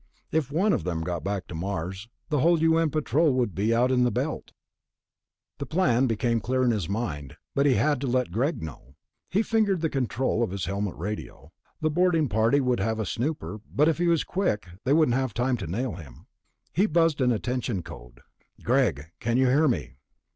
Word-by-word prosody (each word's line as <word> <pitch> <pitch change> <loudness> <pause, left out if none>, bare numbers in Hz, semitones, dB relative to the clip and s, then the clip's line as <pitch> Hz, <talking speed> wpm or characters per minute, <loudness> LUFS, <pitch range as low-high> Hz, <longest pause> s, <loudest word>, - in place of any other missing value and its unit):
If 150 -4 0
one 190 +7 +2
of - - 0
them 85 -3 -2
got 85 -2 -3
back 100 0 -2
to - - -8
Mars, 95 +4 -4 0.2
the 150 -3 +1
whole 165 +4 +4
U.N. 165 0 +3
Patrol 155 0 +2
would 120 -6 0
be 105 +4 0
out 120 +2 +3
in 125 -1 +3
the 125 - +3
Belt.... 135 +6 -3 1.1
The 140 - -4
plan 135 -7 +2
became 115 +1 +1
clear 130 +3 0
in 125 - +3
his 100 -8 -2
mind, 80 - -4 0.2
but 140 +1 +2
he 130 - +4
had 130 +5 +1
to 140 - -2
let 125 -4 0
Greg 125 - -1
know. 70 -3 -10 0.3
He 205 +5 +2
fingered 215 -6 +1
the 160 - 0
control 130 -2 0
of 115 - +1
his 95 0 -3
helmet 100 -1 -2
radio. 105 +6 -6 0.3
The 155 0 +1
boarding 165 -3 +2
party 110 +6 +3
would 125 -2 +1
have 110 +3 0
a 110 - -1
snooper, 110 - -3
but 150 +2 +3
if 165 0 +1
he 175 - +2
was 170 -2 +3
quick, 175 - -1 0.2
they 135 - +3
wouldn't 155 -5 +4
have 130 -4 -1
time 125 +2 +1
to 95 - -6
nail 115 +7 -2
him. 75 -8 -12 0.5
He 195 +6 +3
buzzed 165 -4 +2
an 125 -1 +3
attention 120 -4 -2
code. - - -12 0.4
"Greg? 95 - +1
Can 115 +2 0
you 130 - +4
hear 150 +5 +4
me?" 65 - -2
125 Hz, 205 wpm, -26 LUFS, 100-150 Hz, 1.1 s, whole